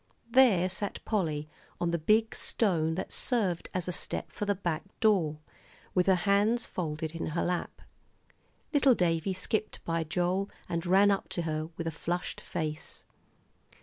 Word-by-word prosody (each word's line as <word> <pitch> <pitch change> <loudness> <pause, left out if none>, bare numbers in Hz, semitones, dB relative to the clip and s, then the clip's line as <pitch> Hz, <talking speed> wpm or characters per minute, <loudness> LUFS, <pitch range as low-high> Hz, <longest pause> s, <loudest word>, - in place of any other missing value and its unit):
There 230 -9 +6
sat 190 +2 -3
Polly 155 -8 -1 0.3
on 175 -1 0
the 170 - 0
big 220 +7 +3
stone 160 -7 +1
that 190 - -4
served 200 -9 0
as 185 -1 -3
a - - 0
step - - -4
for 210 - -3
the 205 0 +1
back 175 -4 -2 0.2
door, 180 -9 +3 0.6
with 180 0 +2
her 190 - +6
hands 205 +6 +2
folded 155 -2 -3
in 165 0 -4
her 165 +2 -1
lap. 180 0 -3 0.9
Little 275 -3 +5
Davie 175 0 +1
skipped 215 +3 -2
by 165 0 0
Joel, 180 +4 0 0.2
and 170 +1 -2
ran 195 +3 +6
up 195 - -1
to 175 - -2
her, 155 0 -2
with 165 - -3
a 165 - -1
flushed 175 +3 -3
face. 155 -1 -5
180 Hz, 160 wpm, -30 LUFS, 165-200 Hz, 0.9 s, There